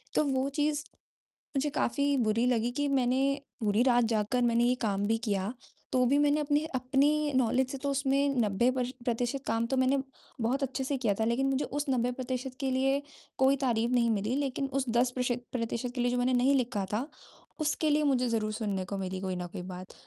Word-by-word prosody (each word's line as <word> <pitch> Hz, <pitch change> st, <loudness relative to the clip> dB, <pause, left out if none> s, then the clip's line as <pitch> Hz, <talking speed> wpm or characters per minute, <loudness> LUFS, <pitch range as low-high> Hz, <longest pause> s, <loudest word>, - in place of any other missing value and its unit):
तो -, -, +4 dB
वो 265 Hz, -1 st, 0 dB
चीज़, 295 Hz, 0 st, 0 dB, 0.7 s
मुझे 295 Hz, +2 st, +1 dB
काफ़ी 285 Hz, 0 st, 0 dB
बुरी 230 Hz, 0 st, +2 dB
लगी 240 Hz, -1 st, +1 dB
कि, 290 Hz, +3 st, -1 dB
मैंने 270 Hz, +1 st, +1 dB, 0.2 s
पूरी 215 Hz, 0 st, +2 dB
रात 245 Hz, -2 st, +4 dB
जागकर 225 Hz, +2 st, 0 dB
मैंने 235 Hz, 0 st, +3 dB
ये 245 Hz, +1 st, +3 dB
काम 200 Hz, 0 st, 0 dB
भी 225 Hz, +1 st, +2 dB
किया, 205 Hz, -1 st, -2 dB, 0.4 s
तो 255 Hz, -1 st, +3 dB
भी 275 Hz, +4 st, +3 dB
मैंने 290 Hz, +1 st, +3 dB
अपने 295 Hz, +1 st, +1 dB
अपनी 285 Hz, +4 st, +2 dB
नॉलेज 255 Hz, +1 st, +2 dB
से 275 Hz, -, -4 dB
तो 280 Hz, -, 0 dB
उसमें 275 Hz, +1 st, +1 dB
90 215 Hz, +2 st, +2 dB
पर्श 250 Hz, -1 st, -1 dB, 0.2 s
प्रतिशत 245 Hz, +3 st, -1 dB
काम 225 Hz, 0 st, +1 dB
तो 265 Hz, -, -1 dB
मैंने 260 Hz, +2 st, +3 dB, 0.4 s
बहुत 260 Hz, +5 st, 0 dB
अच्छे 265 Hz, 0 st, -2 dB
से 275 Hz, +1 st, -1 dB
किया 230 Hz, -6 st, +1 dB
था। 220 Hz, -, +2 dB
लेकिन 240 Hz, +4 st, +1 dB
मुझे 270 Hz, +1 st, 0 dB
उस 290 Hz, +1 st, -3 dB
90% 255 Hz, +1 st, -2 dB
के 270 Hz, -1 st, -1 dB
लिए 270 Hz, +2 st, +1 dB, 0.4 s
कोई 265 Hz, +1 st, +4 dB
तारीफ 240 Hz, -3 st, 0 dB
नहीं 240 Hz, -2 st, +3 dB
मिली, 215 Hz, +3 st, 0 dB
लेकिन 275 Hz, -1 st, -1 dB
उस 275 Hz, -1 st, 0 dB
10% 240 Hz, +2 st, +2 dB
प्रश 250 Hz, 0 st, -1 dB, 0.2 s
प्रतिशत 235 Hz, 0 st, -2 dB
के 245 Hz, -, -1 dB
लिए 245 Hz, 0 st, +1 dB
जो 250 Hz, -, 0 dB
मैंने 250 Hz, +1 st, +1 dB
नहीं 255 Hz, +3 st, +4 dB
लिखा 240 Hz, -6 st, 0 dB
था, 235 Hz, +7 st, -1 dB, 0.5 s
उसके 310 Hz, 0 st, 0 dB
लिए 300 Hz, +1 st, +3 dB
मुझे 255 Hz, -4 st, +2 dB
ज़रूर 220 Hz, -2 st, 0 dB
सुनने 205 Hz, -4 st, -2 dB
को 200 Hz, +2 st, -4 dB
मिली 190 Hz, -1 st, -4 dB
कोई 190 Hz, -1 st, -2 dB
ना 180 Hz, 0 st, -4 dB
कोई 185 Hz, +1 st, -7 dB
बात। 185 Hz, +1 st, -8 dB
250 Hz, 210 wpm, -29 LUFS, 230-275 Hz, 0.7 s, तो